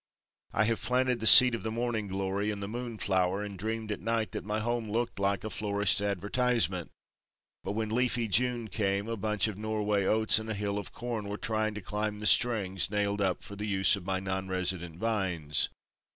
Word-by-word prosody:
I 110 - +2
have 115 +1 0
planted 125 -1 +1
the 110 - +2
seed 125 +1 +10
of 115 - -2
the 110 - -3
morning 115 -2 -2
glory 95 +2 -2
and 105 -1 -3
the - - -4
moon 120 +1 -5
flower 95 0 0
and 100 -1 -6
dreamed 110 +3 -4
at 105 - -3
night 115 +2 -1
that - - -5
my 105 +1 -2
home 115 0 -2
looked 115 0 -2
like 100 0 0
a 110 - -4
florist's 100 -1 +1
advertisement, 105 -1 0 0.7
but 100 - -3
when 110 0 -2
leafy 120 -1 +1
June 120 +2 +1
came 100 -1 -1
a 115 - -2
bunch 105 0 +1
of 105 -2 -6
Norway 105 -2 0
oats 110 0 +3
and 110 0 -7
a 110 - -2
hill 100 0 -2
of 100 - -8
corn 115 -4 -4
were 105 - -4
trying 110 -1 -1
to 105 - -5
climb 105 +2 -3
the 105 - -6
strings 100 -7 +3
nailed 100 0 -1
up 95 -2 0
for 100 - -9
the 105 +1 -4
use 95 -1 +3
of 100 - -8
my 95 +1 -1
non 95 0 -3
resident 90 -3 -3
vines. 90 -9 0
105 Hz, 210 wpm, -30 LUFS, 100-110 Hz, 0.7 s, seed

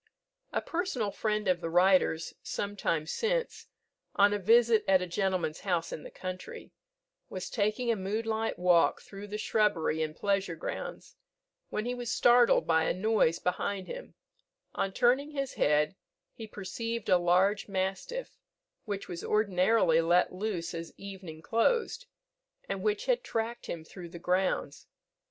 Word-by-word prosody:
A - - 0
personal 300 - -2
friend 210 0 -1
of 180 -2 +2
the 165 - -3
writer's, 180 -2 +3
some 205 0 -4
time 165 -5 0
since, 475 - -2 0.5
on 205 +1 +5
a 205 - 0
visit 225 +2 +4
at 190 -1 +5
a - - -2
gentleman's 180 -3 -1
house 175 -4 -1
in - - -5
the - - -9
country, 185 0 -7 0.6
was 185 0 -6
taking 220 +3 0
a - - +1
moonlight 220 +3 -2
walk 175 -1 +4
through 200 +1 -10
the 210 +1 -4
shrubbery 210 -8 +1
and 155 -1 -2
pleasure 195 -3 0
grounds, - - -6 0.5
when 215 - -3
he 245 - -1
was 245 -2 -4
startled 240 0 +5
by 160 -1 +3
a - - 0
noise 190 -4 +2
behind 190 +1 -2
him; - - -8 0.6
on 195 - -1
turning 260 +8 +2
his 275 -2 -3
head, 150 +3 +2 0.4
he 225 - -8
perceived 230 +3 -5
a 180 - +5
large 185 +4 +2
mastiff, 195 - -3 0.5
which 200 -2 -4
was 170 -1 -6
ordinarily 190 -4 +3
let 175 +2 +3
loose 185 -3 -3
as 165 0 -6
evening 185 -5 -9
closed, 460 - +1 0.6
and 195 -1 -3
which 210 +1 0
had - - +1
tracked 230 +1 -3
him 165 -2 -5
through 175 +1 -10
the 170 - -9
grounds. 180 +2 -1
195 Hz, 150 wpm, -30 LUFS, 180-225 Hz, 0.6 s, on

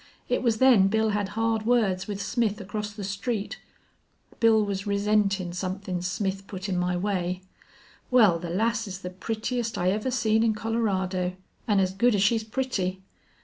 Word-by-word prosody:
It 250 - 0
was 230 -3 +2
then 235 -6 +6
Bill 220 +2 +2
had 205 -2 -1
hard 225 -1 +1
words 215 -6 +2
with 205 -2 -4
Smith 225 0 0
across 210 +1 -4
the 205 -1 -8
street. 200 +2 -3 0.8
Bill 220 -2 +4
was 200 0 -3
resentin' 200 -3 +1
somethin' 185 0 -3
Smith 195 +2 -2
put 190 0 -6
in 190 - -1
my 180 0 0
way. 185 -1 -2 0.7
Wal, 215 -9 +5
the 170 0 -6
lass's 215 0 -1
the 180 - -5
prettiest 225 +4 -3
I 180 +1 +2
ever 215 +5 -1
seen 220 -3 +2
in 225 -1 +2
Colorado, 190 -5 -1 0.3
an' 205 -3 +3
as 185 -1 +1
good 235 +4 +3
as 195 - +2
she's 220 +2 +2
pretty. 215 -6 -2
205 Hz, 165 wpm, -26 LUFS, 190-225 Hz, 0.8 s, then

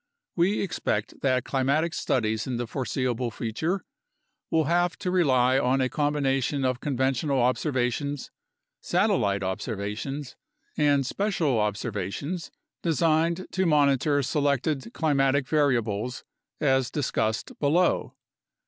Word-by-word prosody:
We 185 +4 +2
expect 105 - -2
that 130 -3 +2
climatic 140 +5 0
studies 110 -8 0
in 125 -2 -2
the 120 - -2
foreseeable 125 -1 -2
future 155 - -3 0.6
will 160 -1 +2
have 175 +3 +1
to 180 - -2
rely 130 -7 +3
on 130 +1 +2
a 130 -1 +1
combination 140 -2 0
of 130 -1 0
conventional 135 0 0
observations, 130 +2 0 0.5
satellite 100 -1 +1
observations, 105 +8 -4 0.4
and 145 -2 +3
special 165 - 0
observations 105 - -3 0.3
designed 165 +2 +1
to 190 -1 +1
monitor 145 -1 +3
selected 140 -2 0
climatic 140 -3 +1
variables 125 -5 0 0.4
as 130 -3 +2
discussed 110 -6 -2
below. 165 +5 +2
135 Hz, 105 wpm, -26 LUFS, 125-155 Hz, 0.6 s, rely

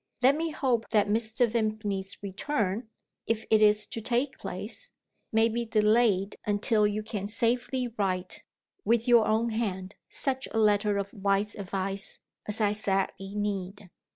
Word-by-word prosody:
Let 270 +3 +6
me 325 +2 -1
hope 255 -7 0
that 210 -2 +3
Mr. 225 +2 +2
Vimpany's 215 -4 -2
return 210 +1 -2 0.4
(if 225 -1 -1
it 215 -1 +5
is 210 0 +4
to 225 - -6
take 250 +4 0
place) - - -6 0.4
may 225 +1 +4
be 235 +1 -1
delayed 215 -3 +2
until 210 +1 +2
you 210 +1 -2
can 210 -2 -4
safely 245 +3 0
write, 190 -5 -2 0.4
with 235 +1 +2
your 235 -3 +6
own 225 +2 +2
hand, 195 -4 -3 0.2
such 265 -1 -1
a - - -2
letter 210 -1 +3
of 200 0 -3
wise 200 +1 0
advice 195 0 -3 0.3
as 210 +1 -1
I 210 -2 +3
sadly 195 -1 -1
need. 200 -2 -3
215 Hz, 150 wpm, -28 LUFS, 200-230 Hz, 0.4 s, Let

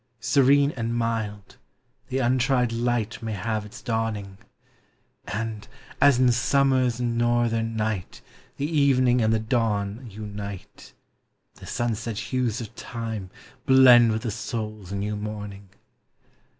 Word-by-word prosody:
Serene 140 +2 +4
and 115 -3 -3
mild, 110 -3 -3 0.5
the 130 0 -2
untried 125 -1 +2
light 120 -1 -1
May 110 -1 -4
have 105 +2 -3
its 105 - -12
dawning; 110 -4 -3 0.9
And, 110 0 -4 0.3
as 140 -2 +6
in 125 -1 +4
summers 130 -1 +2
northern 120 -1 0
night 110 -4 -3 0.3
The 140 - -1
evening 135 -5 +3
and 110 0 +2
the 110 - +3
dawn 110 0 -1
unite, 100 -2 -8 0.6
The - - -13
sunset 115 -2 -2
hues 125 -1 -1
of 110 - -8
Time 115 -5 -6 0.4
blend 125 -3 +7
with 110 0 -2
the 115 - -2
soul's 110 -3 -5
new 100 +1 -2
morning. 105 -2 -7
115 Hz, 120 wpm, -25 LUFS, 105-125 Hz, 0.9 s, blend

